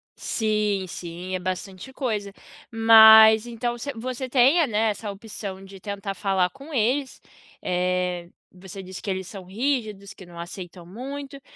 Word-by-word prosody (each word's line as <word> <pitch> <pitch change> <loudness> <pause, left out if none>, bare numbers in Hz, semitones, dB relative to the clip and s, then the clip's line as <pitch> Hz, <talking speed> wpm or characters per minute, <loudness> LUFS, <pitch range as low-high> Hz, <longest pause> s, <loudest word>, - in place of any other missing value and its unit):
Sim, 210 -3 -1
sim, 175 +2 -7
é - - -2
bastante 185 +5 -5
coisa. 215 -7 -3 0.4
Mas 220 0 +8
então 240 +1 -3
se 280 +4 -5
você 255 +2 -5
tenha, 275 +6 +4
né, 220 -1 +1
essa 205 +1 -6
opção 200 -2 -8
de 195 0 -12
tentar 200 0 -5
falar 190 -2 0
com 280 +3 -12
eles. 260 +4 0 0.4
Eh, 180 -1 -1 0.3
você 190 +1 -10
disse 185 0 -9
que 200 - -6
eles 190 -1 -3
são 190 -1 -9
rígidos, 215 -2 -3
que 190 - -14
não 170 -1 -13
aceitam 175 0 -9
muito, 275 - -8
205 Hz, 150 wpm, -24 LUFS, 185-240 Hz, 0.4 s, Mas